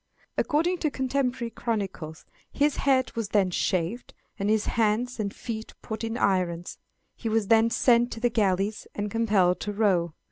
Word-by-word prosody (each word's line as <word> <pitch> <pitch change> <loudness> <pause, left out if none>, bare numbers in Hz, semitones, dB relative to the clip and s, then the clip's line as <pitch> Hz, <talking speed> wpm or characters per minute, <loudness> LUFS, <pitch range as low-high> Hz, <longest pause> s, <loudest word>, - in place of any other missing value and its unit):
According 340 +3 +1
to 310 - +1
contemporary 260 -3 -1
chronicles, 195 -9 -4 0.3
his 290 0 +1
head 260 -2 +2
was 225 -3 -2
then 195 -3 +2
shaved, 185 +6 -1 0.2
and 200 +1 0
his 215 -1 +2
hands 230 +2 0
and 200 -2 -1
feet 220 0 -6
put 220 +1 -5
in 225 +1 -2
irons; 180 -5 0 0.4
he 230 - -4
was 220 -2 0
then 225 0 +5
sent 240 0 +3
to - - -7
the 240 0 +1
galleys, 205 -1 0
and 205 0 -3
compelled 205 -5 +2
to 210 - -3
row. 185 -6 +1
220 Hz, 165 wpm, -27 LUFS, 195-240 Hz, 0.4 s, then